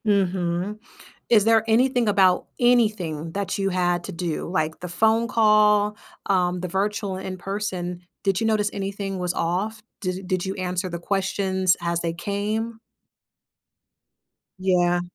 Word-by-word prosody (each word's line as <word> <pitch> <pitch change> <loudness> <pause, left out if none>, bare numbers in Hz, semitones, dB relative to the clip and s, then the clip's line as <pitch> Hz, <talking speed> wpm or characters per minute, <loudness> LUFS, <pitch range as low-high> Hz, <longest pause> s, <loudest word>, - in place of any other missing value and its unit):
Mhm. 190 0 0 0.5
Is 220 -4 +6
there 225 0 +4
anything 245 +1 +3
about 190 -3 +3
anything 210 -10 +2
that 200 -1 -2
you 195 -1 0
had 175 -1 0
to - - -6
do? 170 -2 -3
Like 160 -3 -1
the 180 - -6
phone 220 +6 +2
call, 210 -2 +4 0.3
um, 180 -2 +1
the 180 - -3
virtual 195 +1 -1
in-person, 185 -1 -4 0.2
did 195 -2 +1
you 225 - 0
notice 210 -2 +2
anything 195 -1 -4
was 180 -1 -1
off? 195 +6 -1 0.2
Did 185 -1 -3
did 185 -1 -1
you 190 +1 -3
answer 185 0 -2
the 170 -1 -5
questions 190 0 +1
as 170 0 0
they 170 -1 -2
came? 210 +5 -3 1.8
Yeah. 175 -2 +2
190 Hz, 140 wpm, -24 LUFS, 180-210 Hz, 1.8 s, Is